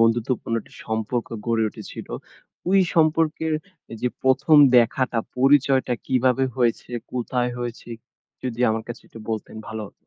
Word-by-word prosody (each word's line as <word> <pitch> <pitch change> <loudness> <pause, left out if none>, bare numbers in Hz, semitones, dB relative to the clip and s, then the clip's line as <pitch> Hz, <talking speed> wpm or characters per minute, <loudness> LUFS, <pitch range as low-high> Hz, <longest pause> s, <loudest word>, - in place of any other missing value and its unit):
বন্ধুত্বপূর্ণ 115 +1 +1
একটা - - -20
সম্পর্ক 110 +2 -2 0.2
গড়ে 115 -1 +2
উঠেছিল। - - -9 0.6
ওই 195 +1 +5 0.2
সম্পর্কের 160 -1 +2 0.5
যে 125 - +1
১ম 135 +4 +4 0.2
দেখাটা 120 +1 +3 0.2
পরিচয়টা 135 -1 +4
কিভাবে 130 0 +2
হয়েছে? 120 -1 0 0.2
কোথায় 125 0 -1
হয়েছে? 120 -1 -6 0.5
যদি 125 -2 -4
আমার 110 0 -1
কাছে 120 0 -7
একটু - - -12
বলতেন 110 0 -4
ভালো 110 0 -5
হতো। - - -16
125 Hz, 130 wpm, -23 LUFS, 115-135 Hz, 0.6 s, ওই